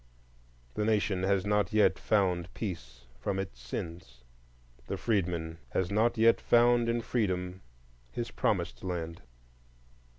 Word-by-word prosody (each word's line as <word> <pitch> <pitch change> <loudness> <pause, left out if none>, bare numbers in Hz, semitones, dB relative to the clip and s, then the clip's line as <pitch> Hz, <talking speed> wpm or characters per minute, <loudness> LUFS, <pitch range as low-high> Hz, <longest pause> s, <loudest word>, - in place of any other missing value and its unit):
The 105 - -1
Nation 105 -3 +1
has 95 0 +1
not 105 -2 +1
yet 110 -1 +4
found 90 -4 +1
peace 65 - -6
from 95 +10 -2
its 95 -10 -5
sins; 60 -1 -7 0.6
the - - -3
freedman 85 -6 -1
has 95 0 0
not 115 +3 +2
yet 115 +1 +5
found 120 0 +4
in 120 0 +1
freedom 95 -6 -1 0.5
his - - -4
promised - - -1
land. 85 -2 -4
95 Hz, 125 wpm, -30 LUFS, 85-110 Hz, 0.6 s, yet